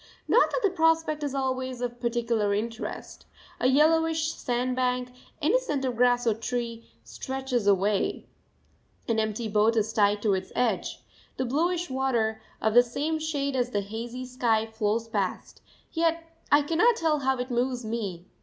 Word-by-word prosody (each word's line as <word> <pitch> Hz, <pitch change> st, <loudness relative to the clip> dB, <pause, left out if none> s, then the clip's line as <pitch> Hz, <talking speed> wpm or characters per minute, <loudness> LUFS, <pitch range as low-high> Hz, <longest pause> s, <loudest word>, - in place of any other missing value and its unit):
Not -, -, +5 dB
that -, -, -1 dB
the 400 Hz, -, +3 dB
prospect 325 Hz, -3 st, +2 dB
is 285 Hz, -2 st, -3 dB
always 260 Hz, -1 st, -2 dB
of 245 Hz, -1 st, -4 dB
particular 230 Hz, -4 st, 0 dB
interest 225 Hz, +2 st, -5 dB, 0.3 s
a -, -, +2 dB
yellowish 320 Hz, +3 st, +3 dB
sandbank, 250 Hz, 0 st, -1 dB, 0.3 s
innocent 315 Hz, -, +1 dB
of 250 Hz, -2 st, -1 dB
grass 245 Hz, +1 st, +3 dB
or 225 Hz, -, +3 dB
tree, 230 Hz, 0 st, -4 dB
stretches 245 Hz, -, -3 dB
away; 200 Hz, +1 st, +1 dB, 0.8 s
an 225 Hz, -1 st, +1 dB
empty 220 Hz, +1 st, -1 dB
boat 215 Hz, +2 st, +3 dB
is 220 Hz, 0 st, 0 dB
tied 205 Hz, -1 st, +2 dB
to 210 Hz, -3 st, +3 dB
its 190 Hz, 0 st, -3 dB
edge; 215 Hz, -, -1 dB, 0.3 s
the 260 Hz, -, -1 dB
bluish 340 Hz, +6 st, 0 dB
water, 235 Hz, -5 st, 0 dB, 0.2 s
of 220 Hz, -, +1 dB
the 245 Hz, -, +9 dB
same 290 Hz, +6 st, -2 dB
shade 285 Hz, -3 st, -2 dB
as 250 Hz, -1 st, +1 dB
the 205 Hz, -4 st, -1 dB
hazy 230 Hz, +5 st, -6 dB
sky, 235 Hz, -3 st, +1 dB
flows 220 Hz, 0 st, -1 dB
past; 200 Hz, -4 st, -3 dB, 0.3 s
yet 330 Hz, 0 st, +1 dB, 0.3 s
I 290 Hz, 0 st, +6 dB
cannot 345 Hz, +11 st, +3 dB
tell 320 Hz, -6 st, +1 dB
how 265 Hz, -1 st, +1 dB
it 250 Hz, +1 st, -4 dB
moves 245 Hz, 0 st, -1 dB
me. 205 Hz, -6 st, -4 dB
245 Hz, 155 wpm, -27 LUFS, 220-280 Hz, 0.8 s, the